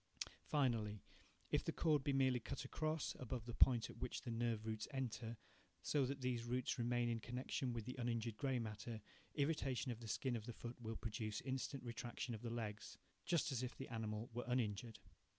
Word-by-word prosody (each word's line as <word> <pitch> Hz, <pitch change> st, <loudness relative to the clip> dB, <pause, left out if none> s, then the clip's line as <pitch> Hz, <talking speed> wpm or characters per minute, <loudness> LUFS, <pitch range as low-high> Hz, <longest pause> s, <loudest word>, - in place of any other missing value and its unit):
Finally, 115 Hz, -8 st, +2 dB, 0.5 s
if -, -, +4 dB
the -, -, +1 dB
cord 150 Hz, -4 st, +4 dB
be 145 Hz, -, +3 dB
merely 130 Hz, -2 st, +5 dB
cut 120 Hz, -, -4 dB
across, 155 Hz, +3 st, 0 dB
above 125 Hz, -2 st, -3 dB
the 120 Hz, -, -4 dB
point 120 Hz, -2 st, +6 dB
at -, -, -10 dB
which -, -, -2 dB
the 120 Hz, -, -2 dB
nerve 115 Hz, -1 st, +1 dB
roots 110 Hz, -1 st, -1 dB
enter, 120 Hz, -4 st, -2 dB, 0.5 s
so 140 Hz, -4 st, +3 dB
that 140 Hz, 0 st, -2 dB
these 125 Hz, -2 st, +1 dB
roots 125 Hz, +1 st, 0 dB
remain 120 Hz, 0 st, +3 dB
in 115 Hz, -1 st, +1 dB
connection 125 Hz, +2 st, -1 dB
with 115 Hz, -2 st, -2 dB
the 125 Hz, -, -3 dB
uninjured 115 Hz, -2 st, 0 dB
grey 135 Hz, +1 st, +1 dB
matter, 110 Hz, 0 st, -3 dB, 0.4 s
irritation 140 Hz, -4 st, +2 dB
of 115 Hz, -, -4 dB
the 115 Hz, -, -7 dB
skin 125 Hz, +3 st, +1 dB
of 110 Hz, 0 st, -4 dB
the 120 Hz, -, -3 dB
foot 120 Hz, +2 st, -6 dB
will 110 Hz, -1 st, -2 dB
produce 110 Hz, -1 st, -2 dB
instant 130 Hz, +1 st, -2 dB
retraction 120 Hz, +1 st, -3 dB
of 110 Hz, -, -4 dB
the 120 Hz, -, -2 dB
legs, 110 Hz, -3 st, -3 dB, 0.3 s
just 170 Hz, -3 st, +3 dB
as 125 Hz, -3 st, +1 dB
if 125 Hz, -1 st, -3 dB
the 135 Hz, -, -5 dB
animal 110 Hz, -1 st, -2 dB
were 120 Hz, +1 st, -1 dB
uninjured. 115 Hz, -2 st, +1 dB
120 Hz, 195 wpm, -43 LUFS, 115-130 Hz, 0.5 s, point